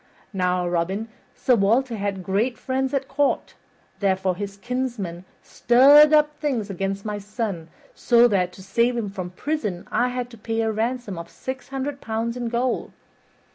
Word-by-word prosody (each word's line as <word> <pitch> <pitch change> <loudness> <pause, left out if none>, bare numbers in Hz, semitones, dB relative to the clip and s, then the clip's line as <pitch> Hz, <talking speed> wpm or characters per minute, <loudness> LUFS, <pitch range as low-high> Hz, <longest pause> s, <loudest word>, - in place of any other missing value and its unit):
Now, 180 -1 0
Robin, 185 +6 -1 0.3
Sir 255 - +2
Walter 230 +4 +2
had 200 -2 -3
great 215 +7 0
friends 265 0 -1
at 275 -1 -1
court, 280 +1 0 0.5
therefore 190 -2 +1
his 200 +1 -6
kinsmen 235 -7 -4 0.2
stirred 285 +5 +6
up 300 -1 +4
things 245 -9 -1
against 195 +2 -3
my 210 -1 -3
son 205 -5 -4 0.3
so 240 0 +5
that, 185 -5 +1
to 190 - -12
save 235 +5 +1
him 215 -4 -2
from 185 -3 -5
prison, 210 - -3
I 245 - +2
had 250 -1 -4
to 230 - -13
pay 225 +1 -2
a 225 0 +1
ransom 225 -3 -2
of 170 0 -8
six 260 0 -7
hundred 275 +1 -4
pounds 225 +1 -2
in 240 -2 -3
gold. 240 +1 -1
225 Hz, 165 wpm, -23 LUFS, 195-255 Hz, 0.5 s, stirred